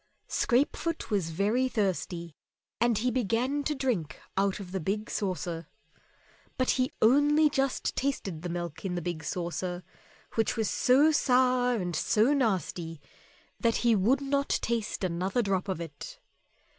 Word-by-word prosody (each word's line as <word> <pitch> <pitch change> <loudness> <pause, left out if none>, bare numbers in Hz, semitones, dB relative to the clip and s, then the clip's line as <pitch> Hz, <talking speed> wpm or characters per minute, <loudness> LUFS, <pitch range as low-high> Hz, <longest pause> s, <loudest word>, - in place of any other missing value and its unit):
Scrapefoot 285 +4 0
was 195 -6 +1
very 210 +10 +1
thirsty, 180 - -2 0.4
and 235 -2 +3
he 245 +4 +1
began 255 +4 0
to 300 - 0
drink 230 - -2 0.2
out 195 +1 +1
of 185 -3 -8
the 190 - -2
big 205 +6 -2
saucer. 175 -4 -3 0.9
But 255 -2 +2
he 255 0 +1
only 290 +5 +5
just 270 -1 0
tasted 200 - -2
the 175 - -4
milk 170 -2 -5
in 185 -2 -2
the 175 - -2
big 170 -2 -4
saucer, 180 +1 -3 0.5
which 225 +1 0
was 220 -3 0
so 280 +5 +4
sour 250 -3 +3
and 180 -6 -2
so 225 +7 +3
nasty 180 - -1 0.6
that 230 -2 +2
he 235 -2 +5
would 235 +8 +3
not 280 0 0
taste 230 -3 -1
another 185 +6 0
drop 195 -2 0
of 185 - -2
it. 160 -4 -8
215 Hz, 145 wpm, -29 LUFS, 180-255 Hz, 0.9 s, only